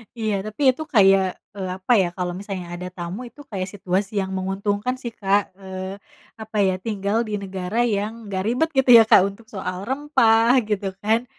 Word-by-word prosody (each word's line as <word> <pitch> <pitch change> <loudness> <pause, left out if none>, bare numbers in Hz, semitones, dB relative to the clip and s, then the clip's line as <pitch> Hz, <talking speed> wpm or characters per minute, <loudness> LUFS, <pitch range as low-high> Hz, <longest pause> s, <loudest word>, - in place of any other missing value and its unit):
Iya. 220 -2 -1
Tapi 215 +6 -7
itu 270 +5 -6
kayak, 195 -3 +6 0.3
eee, 190 -2 -3
apa 190 +5 -3
ya, 180 - +1
kalau 180 -1 -2
misalnya 195 -3 -6
ada 180 +1 -6
tamu, 175 +5 -6
itu 290 - -14
kayak 195 -7 -4
situasi 195 +1 -2
yang 190 0 -4
menguntungkan 205 +5 -1
sih, 235 - -5
Kak. 200 -2 0
Eee, 190 0 -6 0.4
apa 220 0 -6
ya, 190 -1 +2
tinggal 205 0 -2
di 210 - -2
negara 190 +4 -2
yang 215 0 -2
nggak 190 -1 -2
ribet, 255 +8 +1
gitu 265 -1 +3
ya, 225 - +8
Kak, - - +8
untuk 200 +3 -10
soal 185 -3 -5
rempah, 255 -5 +3 0.2
gitu 195 -2 -1
kan, 225 +3 +1
200 Hz, 185 wpm, -22 LUFS, 190-225 Hz, 0.4 s, ya